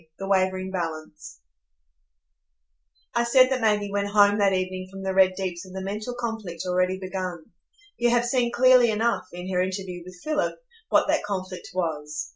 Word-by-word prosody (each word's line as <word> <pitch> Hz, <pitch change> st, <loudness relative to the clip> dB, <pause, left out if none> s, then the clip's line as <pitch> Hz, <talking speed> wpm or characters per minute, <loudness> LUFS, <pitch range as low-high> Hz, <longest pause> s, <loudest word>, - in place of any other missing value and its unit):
The 195 Hz, -, -5 dB
Wavering 190 Hz, -1 st, +1 dB
Balance 155 Hz, -, -6 dB, 1.7 s
I 235 Hz, -, +2 dB
said 255 Hz, +2 st, +5 dB
that 260 Hz, -1 st, 0 dB
Maggie 210 Hz, -2 st, +1 dB
went 200 Hz, 0 st, 0 dB
home 205 Hz, 0 st, +4 dB
that 200 Hz, -1 st, +4 dB
evening 185 Hz, 0 st, -2 dB
from 195 Hz, 0 st, -9 dB
the 190 Hz, 0 st, -1 dB
Red 190 Hz, -1 st, +4 dB
Deeps 180 Hz, -3 st, -4 dB
with 185 Hz, 0 st, -12 dB
a 190 Hz, -, -6 dB
mental 215 Hz, +5 st, -4 dB
conflict 225 Hz, -8 st, -4 dB
already 185 Hz, +1 st, +1 dB
begun. 185 Hz, -3 st, -5 dB, 0.5 s
You 240 Hz, 0 st, +3 dB
have 240 Hz, 0 st, +2 dB
seen 240 Hz, -1 st, +1 dB
clearly 255 Hz, -1 st, +6 dB
enough, 225 Hz, +2 st, 0 dB
in 180 Hz, +2 st, -6 dB
her 180 Hz, -, +2 dB
interview 185 Hz, -1 st, -4 dB
with 180 Hz, 0 st, -12 dB
Philip, 305 Hz, -1 st, 0 dB, 0.3 s
what -, -, +4 dB
that 310 Hz, +1 st, +2 dB
conflict 185 Hz, -2 st, -5 dB
was. 150 Hz, -4 st, -3 dB
190 Hz, 170 wpm, -25 LUFS, 185-220 Hz, 1.7 s, clearly